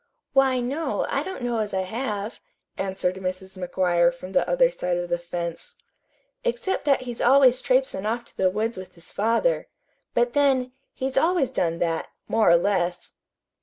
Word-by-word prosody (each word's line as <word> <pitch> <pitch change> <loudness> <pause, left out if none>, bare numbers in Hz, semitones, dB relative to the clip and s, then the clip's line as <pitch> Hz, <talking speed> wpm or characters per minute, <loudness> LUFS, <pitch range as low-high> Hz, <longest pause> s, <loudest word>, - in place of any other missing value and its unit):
"Why, 265 -1 +4
no, 280 +7 -1
I - - 0
don't 375 -9 -6
know 240 -1 0
as 210 -2 -2
I 190 - +1
have," 210 +1 -4 0.4
answered 190 -1 -1
Mrs. 190 0 -5
McGuire 175 -2 +2
from 180 +2 -10
the 275 - +1
other - - +4
side 180 - -1
of 175 0 -3
the 175 0 0
fence, 170 -1 -5 0.7
"except 475 -9 -1
that 275 -2 +3
he's 245 -2 -5
always 255 0 +5
traipsin' 255 -5 +1
off 235 +2 -2
to - - -14
the 185 - +2
woods 215 +4 -2
with 185 -1 -11
his 170 0 -10
father. 230 - +1 0.5
But 240 0 +2
then, 265 -3 +2 0.2
he's 265 0 -3
always 325 -2 +2
done 170 -1 0
that, 165 -1 -1 0.2
more 225 -4 +3
or 170 - +7
less." 180 -1 -1
220 Hz, 170 wpm, -25 LUFS, 185-265 Hz, 0.7 s, or